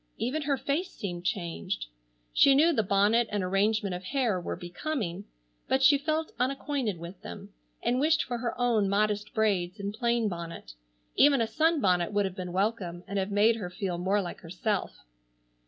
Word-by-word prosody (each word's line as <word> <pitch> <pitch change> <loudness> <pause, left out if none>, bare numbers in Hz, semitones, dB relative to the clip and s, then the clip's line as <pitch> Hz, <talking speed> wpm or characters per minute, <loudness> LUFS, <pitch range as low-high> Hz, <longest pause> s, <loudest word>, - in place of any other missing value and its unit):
Even 280 +6 -1
her 280 -1 0
face 310 +8 -1
seemed 175 -3 -6
changed. 170 - -2 0.5
She 275 - +6
knew 325 +4 +5
the 225 - +2
bonnet 210 +4 +3
and 205 -2 -1
arrangement 200 +1 +1
of 180 +1 -5
hair 235 -6 0
were - - -4
becoming, 190 - -4 0.4
but 265 0 +2
she 280 +1 +6
felt 310 +2 -1
unacquainted 265 -5 -1
with 170 +3 -9
them, 85 - -9 0.3
and 250 +1 +1
wished 315 +2 +3
for 240 -1 -4
her 235 0 -3
own 230 -5 +2
modest 210 +1 0
braids 200 -3 +1
and 200 0 -3
plain 235 0 +1
bonnet. 170 - -6 0.4
Even 280 -2 +5
a 230 - +2
sunbonnet 220 - +2
would 205 -1 +2
have 190 -1 -4
been 180 -2 -5
welcome 185 -3 -1
and 200 +1 -2
have 190 +1 -1
made 210 +3 +4
her 190 -5 -5
feel 180 -2 -3
more 195 +3 +1
like 175 - -6
herself. 185 +4 -3
205 Hz, 175 wpm, -28 LUFS, 185-250 Hz, 0.5 s, She